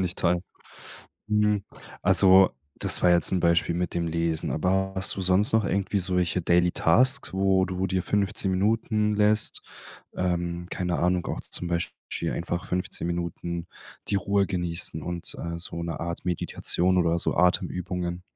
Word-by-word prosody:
finde 95 - +1
ich 90 - -6
toll. 85 0 +1 0.9
Hm, 105 -1 +1 0.4
also, 95 0 +6 0.3
das - - +2
war 90 - +5
jetzt 85 -1 +4
'n 90 - +1
Beispiel 85 0 +2
mit 90 -1 -3
dem 85 -1 -1
Lesen. 80 -1 -1
Aber 95 +4 0
hast 95 -1 +2
du 95 - -4
sonst 95 +4 +3
noch 110 -2 +3
irgendwie 100 +1 -1
solche 90 -1 +1
daily 90 +1 +3
tasks, 130 +11 +2
wo 95 -1 +2
du 95 +1 -2
dir 95 -1 -1
15 100 -1 -1
Minuten 105 +2 0
lässt 105 +1 +1 0.5
ähm, 85 -1 -2
keine 90 -2 -2
Ahnung, 90 0 0
auch - - -4
zum 90 - -3
Beispiel 85 0 -4
einfach 85 0 -4
15 90 -1 -3
Minuten 85 0 -4 0.4
die - - +1
Ruhe 100 +1 +1
genießen 85 -3 -2
und, 85 0 -1
äh, 85 0 -5
so 85 0 -4
'ne 85 -3 -5
Art 85 0 -5
Meditation 90 +1 0
oder 85 -1 +1
so - - 0
Atemübungen? 90 0 -1
90 Hz, 160 wpm, -25 LUFS, 85-95 Hz, 0.9 s, also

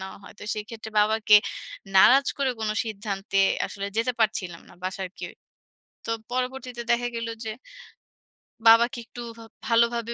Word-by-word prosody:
নেওয়া 190 0 -8
হয়। 200 - -13
তো - - -12
সেক্ষেত্রে 220 +1 -7
বাবাকে 215 0 +4 0.6
নারাজ 270 +8 +7
করে 275 -2 +1
কোন 215 -1 -1
সিদ্ধান্তে 200 -2 -3 0.3
আসলে 200 -1 -6
যেতে 230 +3 +1
পারছিলাম 185 -6 0
না - - -16
বাসার 190 0 -3
কেউ। 175 - -6 0.7
তো - - -3 0.2
পরবর্তীতে 255 -1 -3
দেখা 240 +1 +2
গেল 230 0 -3 0.2
যে, - - -2 1.2
বাবাকে 235 +2 +5
একটু 240 - -10 0.2
ভা 225 - -11 0.2
ভালোভাবে 235 0 +2
225 Hz, 140 wpm, -25 LUFS, 205-240 Hz, 1.2 s, নারাজ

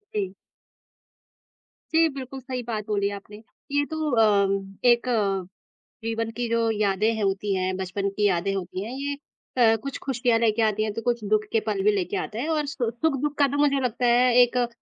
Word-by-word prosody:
जी। 195 -3 -1 1.6
जी, 325 0 +5
बिल्कुल, 270 -1 -7
सही 255 -1 -5
बात 215 -3 -3
बोली 200 -1 0
आपने। 205 +1 -11 0.3
ये 285 0 +2
तो 315 0 -3
अ, 210 -4 +4 0.4
एक 240 0 +4 1.0
जीवन 225 0 -2
की 245 - -1
जो 230 0 +1
यादें 215 +1 +1
होती 195 0 0
हैं, 185 0 -1
बचपन 190 +1 -2
की 210 -1 +3
यादें 190 +1 0
होती 185 0 -4
हैं, 225 - -6 0.2
ये 285 - -1 0.6
अ, - - +3
कुछ 275 0 -4
खुशियाँ 245 -3 +1
लेके 225 -1 +2
आती 215 -1 +2
हैं 215 - -1
तो 230 - -4
कुछ 235 -1 -1
दुःख 215 0 +2
के 225 - +3
पल 205 -2 0
भी 210 - +5
लेके 190 -4 -1
आते 215 - -6
हैं 275 - -2
और 300 -1 0
सु 245 -5 -1
सुख-दुःख 290 +3 -1
का 285 - +6
तो - - 0
मुझे 285 -1 +3
लगता 245 +1 -1
है 245 +1 +4
एक 245 0 +3
अ, 245 -1 +2
225 Hz, 195 wpm, -25 LUFS, 205-250 Hz, 1.6 s, का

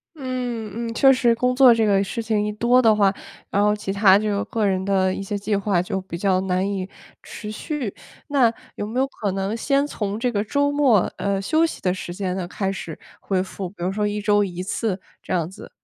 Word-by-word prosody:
嗯 240 -5 -4
嗯， 230 - -4
确 270 +3 +6
实 245 -2 +3
工 250 +2 +1
作 255 -2 +8
这 225 -1 +2
个 200 -2 +3
事 230 +4 -4
情 220 -2 0
一 210 - -1
多 240 +4 +3
的 220 -2 +5
话， 200 -2 +3 0.4
然 200 - +1
后 210 0 +3
其 210 -2 -4
他 200 -1 +6
就 205 -1 -1
个 220 -2 -1
人 190 -1 +1
的 190 -1 +1
一 - - -4
些 200 +1 -3
计 205 +1 -1
划 195 -3 +1
就 190 +1 -3
比 185 -2 -7
较 185 0 +1
难 190 0 0
以 195 -2 -3 0.3
持 210 -1 -8
续。 245 0 -4 0.3
那 270 -6 +3 0.2
有 205 - -4
没 240 +4 -2
有 265 - +3
可 210 -7 -3
能 195 +2 -2
先 275 +4 +1
从 210 -7 -3
这 245 +1 0
个 205 -1 0
周 285 +6 +1
末， 275 -9 +4 0.2
呃， 200 -1 -1
休 315 +11 +2
息 330 - -5
的 180 -1 +1
时 175 -2 -6
间 185 0 -3
呢 185 -2 -3
开 195 +1 -2
始 170 -5 -6 0.2
恢 190 -2 -1
复， 190 -1 -6
比 175 -2 -9
如 185 - 0
说 210 +1 0
1 205 0 -2
周 205 0 +3
1 180 -2 -4
次 200 0 -2 0.2
这 - - -9
样 170 -3 0
子。 190 - -12
205 Hz, 245 characters per minute, -22 LUFS, 190-230 Hz, 0.4 s, 作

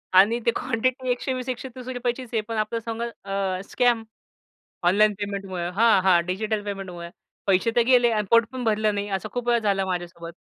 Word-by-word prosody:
आणि 210 +6 +6
ते 235 - +4
क्वांटिटी 255 +1 -1
₹120-₹130 255 -1 -3
चीच 255 -2 -9
आहे. 220 - +2
पणआपल्या 225 0 -1
संग 230 +1 -5 0.2
अ 195 -2 -2
स्कॅम, 240 -2 +2 0.9
ऑनलाईन 210 +3 +4
पेमेंट 200 -1 -4
मुळं. 175 -2 -3
हां, 225 -1 +5
हां, 180 -2 +5
डिजिटल 210 +3 -2
पेमेंटमुळे 185 -4 -6 0.4
पैसे 195 +3 +3
तर - - +6
गेले 245 -2 +5
आणि 210 -2 0
पोट 230 0 +5
पण 255 -1 -4
भरलं 215 -1 +1
नाही, 205 0 -3
असं 195 -2 -3
खूप 245 -1 -3
वेळा 240 0 +4
झाला 200 -3 +1
माझ्यासोबत. 175 -2 -5
215 Hz, 170 wpm, -24 LUFS, 195-240 Hz, 0.9 s, आणि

